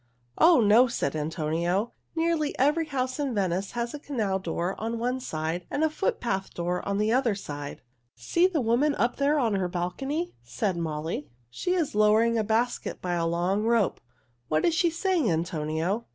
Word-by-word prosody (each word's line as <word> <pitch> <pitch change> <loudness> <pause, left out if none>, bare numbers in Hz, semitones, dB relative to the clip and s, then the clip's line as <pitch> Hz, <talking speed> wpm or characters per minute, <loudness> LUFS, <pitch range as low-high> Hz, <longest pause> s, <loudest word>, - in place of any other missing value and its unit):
"Oh, 330 -6 +7
no!" 225 +4 +6
said 155 - -2
Antonio. 165 +7 -1 0.2
"Nearly 325 -2 0
every 300 +4 +2
house 260 -2 -2
in 275 -5 -1
Venice 190 -1 -1
has 235 0 -2
a 295 - -5
canal 220 -10 -1
door 175 +1 -2
on 230 +1 -2
one 250 +3 -1
side 165 -5 -3
and 300 - -1
a 315 - +2
footpath 235 - -1
door 175 +1 -2
on 200 0 0
the 210 +1 +1
other 245 -4 +2
side." 145 -6 -7 0.3
"See 230 - +2
the 340 -6 -1
woman 250 +6 +2
up 240 +1 0
there 285 +2 +2
on 235 -6 +1
her 190 -2 0
balcony," 270 - -3
said 125 - -2
Molly. 155 -2 -3 0.2
"She 360 - -1
is 330 -5 0
lowering 215 +2 +4
a 220 - +2
basket 225 +3 -1
by 180 -1 -2
a 170 -1 0
long 175 +4 0
rope. 225 -2 +1 0.5
What 155 +2 +1
is 335 - +3
she 340 +1 +3
saying, 335 - +1
Antonio?" 165 +5 -1
215 Hz, 180 wpm, -27 LUFS, 175-275 Hz, 0.5 s, Oh